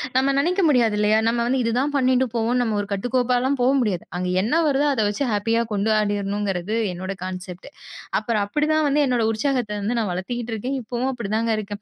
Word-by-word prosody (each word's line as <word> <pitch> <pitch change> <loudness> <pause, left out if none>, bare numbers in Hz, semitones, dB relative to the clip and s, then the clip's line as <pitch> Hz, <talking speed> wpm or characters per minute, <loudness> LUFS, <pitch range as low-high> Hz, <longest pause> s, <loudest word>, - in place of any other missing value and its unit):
நம்ம 270 +1 +3
நினைக்க 360 +6 +1
முடியாது. 235 -6 +3
இல்லையா? 215 +1 +3
நம்ம 235 +1 +1
வந்து, 260 +1 +1
"இதுதான் 255 +6 0
பண்ணிட்டு 260 0 +2
போவோம்." 235 +2 +1
நம்ம 220 -3 0
ஒரு 200 - -6
கட்டுக்கோப்பாலாம் 250 +5 0
போ 245 - +3
முடியாது. 195 -7 -1
அங்க 180 0 -2
என்ன 310 +10 +2
வருதோ 285 +1 +2
அதை 220 -5 +1
வச்சு 210 +7 -2
ஹேப்பியா 225 +3 +1
கொண்டாடிர்ணும்ங்கிறது 205 -1 0 0.2
என்னோட 185 +2 -5
கான்செப்ட். 185 +3 -7 0.5
அப்புறம் 215 -1 -1
அப்படிதான் 305 +5 +1
வந்து 295 +1 +2
என்னோட 240 -3 +1
உற்சாகத்த 245 -2 -1
வந்து 235 +4 -1
நான் 205 -5 -1
வளர்த்துகிட்டு 230 +5 -4
இருக்கேன். 255 +6 -3
இப்போவும் 245 +3 -2
அப்படிதாங்க 225 0 -1
இருக்கேன். 205 0 -7
230 Hz, 180 wpm, -22 LUFS, 205-255 Hz, 0.5 s, நம்ம